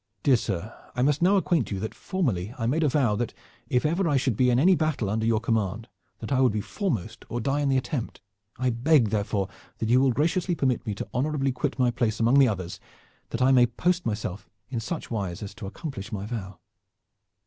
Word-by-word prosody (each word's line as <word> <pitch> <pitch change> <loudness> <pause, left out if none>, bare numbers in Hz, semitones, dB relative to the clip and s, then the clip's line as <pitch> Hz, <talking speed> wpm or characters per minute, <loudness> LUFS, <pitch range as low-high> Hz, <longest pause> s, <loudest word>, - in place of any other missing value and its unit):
Dear 135 - +5
sir, 105 0 -4 0.2
I 125 - +1
must 145 +3 +2
now 190 +3 +5
acquaint 170 - +1
you 100 - -3
that 110 +3 -4
formerly 120 - -2
I 115 - -2
made 145 +8 +1
a 155 - +3
vow 125 -6 +2 0.5
if 125 +4 +1
ever 170 +3 +1
I 145 - +3
should 130 -3 +1
be 125 +3 +3
in 120 - +3
any 175 +9 +5
battle 155 - 0
under 110 +1 0
your 115 -2 +3
command 110 -1 -1 0.3
that - - -6
I 130 -1 +3
would 125 -5 +4
be 105 - 0
foremost 115 - -3
or 120 - -2
die 135 +5 0
in 140 - +1
the 135 - +3
attempt. 130 -1 -3 0.4
I 130 0 +1
beg 120 0 +3
therefore 100 -2 0 0.3
that 110 - -2
you 125 +2 +5
will 135 -1 +4
graciously 170 +7 +1
permit 130 -7 0
me 105 - -1
to - - -5
honorably 135 +1 0
quit 130 +3 -2
my 125 -2 +3
place 110 -2 -1
among 120 +5 +5
the 135 - +7
others, 90 -5 -3 0.5
that 115 +2 -1
I 130 - +5
may 125 -2 +6
post 175 +9 0
myself 105 -4 -4 0.2
in 120 - -1
such 155 +7 -5
wise 100 -5 -3
as 100 - -7
to 105 -2 -8
accomplish 105 - -7
my 100 -1 -4
vow." 100 -5 -5
125 Hz, 220 wpm, -26 LUFS, 110-145 Hz, 0.5 s, the